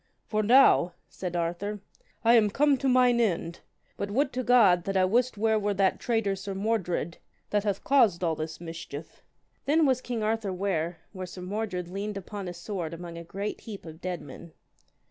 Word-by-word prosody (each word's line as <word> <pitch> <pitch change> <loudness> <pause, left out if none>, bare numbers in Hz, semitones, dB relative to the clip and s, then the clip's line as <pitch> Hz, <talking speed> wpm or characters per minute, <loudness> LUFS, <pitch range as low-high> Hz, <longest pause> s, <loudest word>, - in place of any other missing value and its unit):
For 215 0 0
now, 215 -6 +5 0.2
said 180 -2 -5
Arthur, 175 +5 -2 0.5
I 230 - +7
am 220 -3 +5
come 285 +6 +3
to 265 +1 0
mine 250 -1 +4
end. 170 -6 0 0.4
But 200 - -3
would 270 +6 +1
to 255 - -1
God 215 -9 +5
that 195 -1 0
I 185 - +4
wist 240 +4 +1
where 220 +1 +2
were 205 -1 -1
that 195 0 +2
traitor 225 -5 0
Sir 195 0 -6
Mordred, 190 -5 -1 0.3
that 205 0 +1
hath 200 -2 -1
caused 225 -11 +3
all 165 -2 +2
this 155 +1 -5
mischief. 165 -2 -8 0.4
Then 310 +3 +4
was 260 -2 +2
king 235 -4 -3
Arthur 220 -2 0
ware 180 -3 -1
where 185 -2 -6
Sir 180 +1 -9
Mordred 190 -2 -3
leaned 200 +3 -4
upon 195 0 -6
his 175 -1 -6
sword 175 -3 -4
among 170 0 -8
a 170 - -7
great 200 +5 -5
heap 205 -5 -9
of 160 +1 -10
dead 180 -2 -3
men. 170 -2 -11
200 Hz, 190 wpm, -28 LUFS, 175-225 Hz, 0.5 s, I